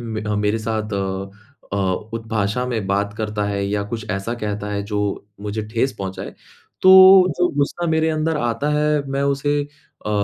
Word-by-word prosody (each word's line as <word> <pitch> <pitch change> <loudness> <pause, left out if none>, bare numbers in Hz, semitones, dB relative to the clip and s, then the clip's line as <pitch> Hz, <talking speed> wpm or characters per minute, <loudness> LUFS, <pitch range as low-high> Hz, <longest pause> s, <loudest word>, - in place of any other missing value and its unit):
म 110 -2 -4
अ, 105 - -1
मेरे 105 +2 +1
साथ 110 -1 -3
अ 95 0 -3 0.4
अ, - - 0 0.4
उत 115 0 -5
भाषा 110 +3 -1
में 110 -6 -2
बात 100 +1 -1
करता 105 -1 -2
है 100 -1 -1
या 100 0 -1
कुछ 110 -1 -7
ऐसा 100 +4 -2
कहता 105 -2 -4
है 100 0 -2
जो 105 - +1 0.4
मुझे 105 +1 -3
ठेस 130 +3 +1
पहुँचाए 95 -1 -6 0.5
तो 185 0 +8 0.5
जो 180 - +3
ग़ुस्सा 170 +4 0
मेरे 160 0 +2
अंदर 155 0 0
आता 120 +4 -1
है 150 -1 +2
मैं 140 0 0
उसे 145 +1 0 0.4
अ, - - -1
110 Hz, 180 wpm, -21 LUFS, 100-135 Hz, 0.5 s, तो